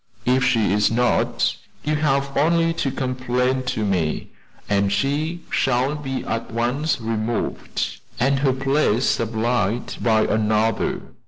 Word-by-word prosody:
If 125 +1 +3
she 115 -6 +2
is 105 0 +3
not, 120 +2 +1 0.3
you 150 +1 0
have 140 -2 0
only 165 +3 +3
to 145 - -1
complain 125 0 -1
to 110 - -1
me, 90 -6 -1 0.4
and 100 -1 +1
she 145 - -1
shall 130 +2 +1
be 135 -3 -4
at 115 0 -3
once 125 +7 0
removed, 115 0 -2 0.2
and 135 +2 +2
her 135 -1 +3
place 135 -3 +1
supplied 115 0 0
by 110 -2 +4
another. 110 +1 +1
125 Hz, 130 wpm, -22 LUFS, 110-140 Hz, 0.4 s, by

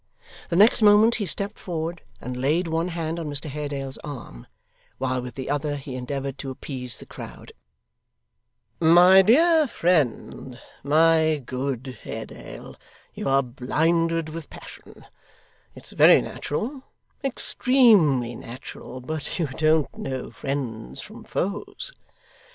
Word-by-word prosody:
The 170 - -1
next 210 +5 +6
moment, 215 +2 +6
he 200 - -1
stepped 200 +5 -3
forward, 170 -1 -4 0.2
and 125 +1 -6
laid 150 +8 +1
one 165 +1 -1
hand 165 -1 -3
on 160 -3 -4
Mr 145 +2 -3
Haredale's 140 -2 -5
arm, 125 - -9 0.5
while 130 -1 -1
with 125 -1 -8
the 130 - -6
other 145 0 -1
he 135 -1 -7
endeavoured 135 +2 -4
to 135 - -5
appease 130 -1 -6
the - - -12
crowd. - - -10 1.3
'My 175 +3 +7
dear 310 - +5
friend, 140 - -1 0.2
my 160 0 +3
good 130 -1 -4
Haredale, - - -9 0.4
you - - -3
are 135 0 +3
blinded 165 +6 0
with 160 -1 -8
passion - - -13 0.7
it's - - -12
very - - +7
natural, 250 - -4 0.4
extremely 215 - +3
natural 125 +2 -9
but 155 +3 -4
you 170 - 0
don't 155 +2 +1
know 130 -1 -5
friends 115 - -5
from - - -11
foes. 205 - -4
150 Hz, 125 wpm, -24 LUFS, 130-175 Hz, 1.3 s, My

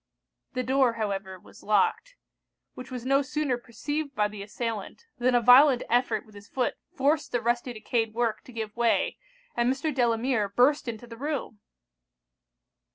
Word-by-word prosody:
The 255 -1 -1
door, 260 -1 +3
however, 195 -4 -3
was - - -17
locked. 215 - +1 0.6
Which 255 - -9
was 250 -2 -6
no 275 +1 +3
sooner 285 -1 -1
perceived 280 +5 -5
by 210 -1 +2
the 205 -1 -8
assailant, 220 - -5
than 245 0 +2
a 240 - +4
violent 250 +2 +7
effort 245 +1 +1
with 215 - -19
his 205 +1 -13
foot 255 0 -1 0.2
forced 295 +3 +1
the 245 - +1
rusty 240 +2 0
decayed 225 0 -2
work 230 -2 0
to - - -12
give 220 -2 -5
way, 235 -1 +1 0.4
and 240 +1 +2
Mr. 285 +3 -2
Delamere 235 -3 +1
burst 255 +7 +3
into 235 0 -5
the 230 -1 -11
room! 280 -5 -4
240 Hz, 160 wpm, -27 LUFS, 220-265 Hz, 0.6 s, violent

